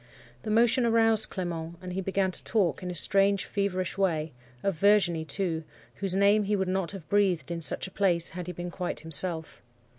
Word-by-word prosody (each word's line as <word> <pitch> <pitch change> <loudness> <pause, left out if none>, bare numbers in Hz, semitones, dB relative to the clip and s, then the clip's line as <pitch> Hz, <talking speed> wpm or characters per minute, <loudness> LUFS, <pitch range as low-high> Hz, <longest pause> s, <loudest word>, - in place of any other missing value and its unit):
The - - -6
motion 235 +3 +3
aroused 225 -2 +4
Clement, 170 -2 -5
and 180 0 -7
he 190 - -2
began 190 0 0
to - - 0
talk 185 - 0
in 180 - -5
a 180 - -5
strange, 195 +2 +2
feverish 195 -2 -2
way, 160 -6 0 0.3
of 195 - +1
Virginie, 175 -3 +3
too,—whose 180 +3 -4
name 200 +2 +4
he 205 +1 +1
would 190 -2 -1
not 185 -2 -1
have 180 -7 -9
breathed 190 -3 +1
in 170 -1 -4
such - - +2
a 190 - -9
place 180 -4 +2
had 180 0 -7
he 180 - -5
been 175 0 -6
quite 180 0 -4
himself. 160 +1 -3
185 Hz, 190 wpm, -28 LUFS, 170-200 Hz, 0.3 s, aroused